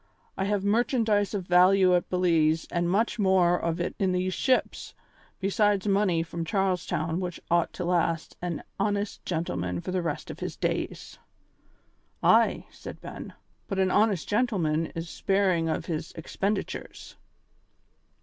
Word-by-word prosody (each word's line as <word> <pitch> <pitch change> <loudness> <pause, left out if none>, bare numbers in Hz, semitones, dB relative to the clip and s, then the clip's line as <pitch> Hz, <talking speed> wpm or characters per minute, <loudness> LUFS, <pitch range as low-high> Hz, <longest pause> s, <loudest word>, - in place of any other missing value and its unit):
I 190 - -1
have 200 -1 0
merchandise 215 -2 +1
of 190 -3 -3
value 185 +1 +5
at 175 - -1
Belize 165 -3 +2
and 175 0 0
much 220 +5 +1
more 185 -3 +3
of 170 0 -1
it 175 - -2
in 190 -2 +1
these 185 +1 0
ships, 260 +5 0 0.4
besides 200 0 +1
money 195 -4 +2
from 165 0 -5
Charles 185 +1 0
Town 165 0 -1
which 180 -2 -4
ought 170 -1 +2
to 180 - -4
last 170 -2 0
an 175 -3 -3 0.2
honest 205 0 -1
gentleman 90 - -2
for 185 - -5
the 185 -1 0
rest 165 -4 -4
of - - -10
his - - -4
days." - - -3 1.0
"Ay," - - +4
said - - -10
Ben, - - -9 0.3
"but 195 - -3
an 190 -1 +2
honest 205 -4 +2
gentleman 185 -9 +1
is 165 +1 -4
sparing 185 -2 +1
of - - -2
his 160 -2 -4
expenditures." 195 +5 -4
180 Hz, 150 wpm, -27 LUFS, 165-200 Hz, 1.0 s, value